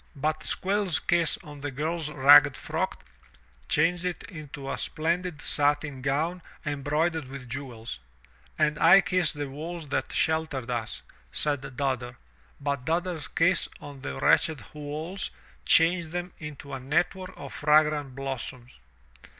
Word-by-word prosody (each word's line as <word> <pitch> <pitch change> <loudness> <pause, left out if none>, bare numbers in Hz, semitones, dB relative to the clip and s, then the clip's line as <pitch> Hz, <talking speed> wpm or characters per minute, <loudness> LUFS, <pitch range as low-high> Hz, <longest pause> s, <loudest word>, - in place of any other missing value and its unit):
But 155 +2 0
Squiirs 190 -4 0
kiss 170 -1 +2
on 145 -3 -10
the 145 0 -3
girFs 155 +3 -2
ragged 140 0 +8
frock - - -3 0.6
changed 170 +3 +3
it 180 -1 -3
into 150 -6 -8
a - - -3
splendid 170 +1 -1
satin 145 -2 +1
gown 155 +7 0 0.2
embroidered 150 +2 0
with 135 -1 -9
jewels. 120 - -6 0.6
And 150 0 +2
I 175 +4 +8
kiss 180 -4 +2
the 145 -1 -4
walls 155 +3 -6
that - - -1
sheltered 155 -6 0
us," 115 -2 -3 0.3
said 140 - -1
Dodder. 125 -3 -1 0.4
But 140 -2 -2
Dodder's 170 -1 -1
kiss 170 0 +2
on 145 -1 -10
the 145 +2 -5
wretched 150 -10 +3
walls 150 +5 -4 0.4
changed 165 0 +5
them 175 +1 -4
into 145 -2 -8
a 135 - -3
network 175 +7 -1
of - - -8
fragrant 150 -2 +3
blossoms. 130 - -5
150 Hz, 135 wpm, -27 LUFS, 135-165 Hz, 0.6 s, ragged